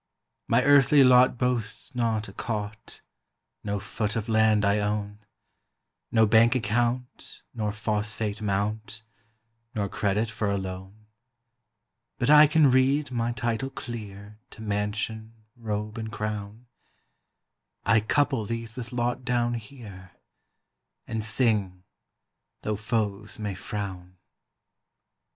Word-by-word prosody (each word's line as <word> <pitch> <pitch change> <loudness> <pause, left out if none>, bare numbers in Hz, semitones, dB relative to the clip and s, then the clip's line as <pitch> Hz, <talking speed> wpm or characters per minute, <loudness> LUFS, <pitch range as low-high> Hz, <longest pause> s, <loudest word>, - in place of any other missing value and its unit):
My - - +3
earthly 145 0 +6
lot 125 -1 +6
boasts 120 +1 -2
not 115 -3 0
a 95 - -11
cot, 105 -1 -5 0.6
No 100 -1 -2
foot 105 +1 -3
of 115 -1 -2
land 110 -2 +3
I 100 +1 +3
own, 105 0 -2 0.9
No 110 -1 +5
bank 115 +3 +5
account 120 +2 -2
nor 110 -4 -2
phosphate 105 0 -2
mount, 105 +2 -2 0.7
Nor 105 -2 0
credit 105 +3 0
for 105 -2 -2
a 100 - 0
loan; 95 +2 -7 1.1
But 130 +2 +2
I 150 0 +9
can 150 -2 +4
read 135 +2 +2
my 120 -1 -1
title 120 +2 -2
clear 105 -5 -8
To 110 - -11
mansion, 110 +2 -3 0.2
robe, 105 -1 -4
and 110 0 -5
crown; 105 +2 -5 1.2
I 110 +2 +5
couple 135 +2 +1
these 115 +1 -5
with 120 -2 -7
lot 120 +1 -1
down 120 -1 +1
here, 110 -6 -9 0.9
And 110 -1 -3
sing, 105 -5 +1 0.8
tho' 105 - -1
foes 105 -1 -2
may 105 -2 -3
frown. 95 -2 -6
110 Hz, 115 wpm, -26 LUFS, 105-120 Hz, 1.2 s, I